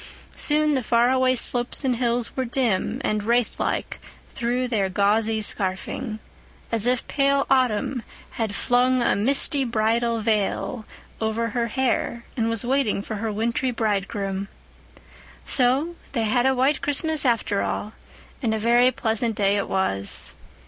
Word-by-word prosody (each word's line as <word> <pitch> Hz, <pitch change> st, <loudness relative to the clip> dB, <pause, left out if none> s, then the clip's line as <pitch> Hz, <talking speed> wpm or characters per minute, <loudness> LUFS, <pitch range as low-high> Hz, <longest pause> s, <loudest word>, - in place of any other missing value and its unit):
Soon 300 Hz, 0 st, +3 dB
the 265 Hz, -, +1 dB
far 235 Hz, +1 st, +3 dB
away 260 Hz, 0 st, +3 dB
slopes 245 Hz, +2 st, 0 dB
and 250 Hz, -2 st, +1 dB
hills 240 Hz, -1 st, 0 dB
were 260 Hz, -, 0 dB
dim 235 Hz, -6 st, 0 dB
and 215 Hz, 0 st, 0 dB
wraith 235 Hz, +1 st, +1 dB
like -, -, -2 dB, 0.3 s
through 245 Hz, +1 st, -1 dB
their 205 Hz, -6 st, 0 dB
gauzy 215 Hz, +3 st, +1 dB
scarfing, 205 Hz, +3 st, -2 dB, 0.5 s
as 230 Hz, 0 st, 0 dB
if 250 Hz, -1 st, +1 dB
pale 275 Hz, 0 st, +2 dB
autumn 255 Hz, -1 st, +1 dB, 0.3 s
had 220 Hz, -3 st, -3 dB
flung 250 Hz, +1 st, +2 dB
a -, -, +2 dB
misty 270 Hz, +5 st, +2 dB
bridal 230 Hz, 0 st, 0 dB
veil 215 Hz, +1 st, -1 dB, 0.4 s
over 220 Hz, +1 st, -1 dB
her 235 Hz, +1 st, -1 dB
hair 235 Hz, -1 st, -1 dB
and 230 Hz, -2 st, 0 dB
was 230 Hz, 0 st, -2 dB
waiting 255 Hz, -6 st, +1 dB
for 215 Hz, -, -5 dB
her 220 Hz, +1 st, -2 dB
wintry 235 Hz, +6 st, -1 dB
bridegroom. 200 Hz, -3 st, -2 dB, 1.0 s
So 270 Hz, +6 st, +2 dB, 0.2 s
they 230 Hz, -4 st, 0 dB
had 245 Hz, +4 st, +2 dB
a 265 Hz, -, +2 dB
white 270 Hz, +4 st, +2 dB
Christmas 310 Hz, +2 st, -1 dB
after 230 Hz, -5 st, +1 dB
all, 215 Hz, -, -3 dB, 0.5 s
and 225 Hz, -4 st, 0 dB
a -, -, -1 dB
very 240 Hz, +3 st, +4 dB
pleasant 225 Hz, -2 st, -1 dB
day 200 Hz, 0 st, +2 dB
it 200 Hz, -, -2 dB
was. 100 Hz, -, 0 dB
235 Hz, 150 wpm, -23 LUFS, 215-255 Hz, 1.0 s, very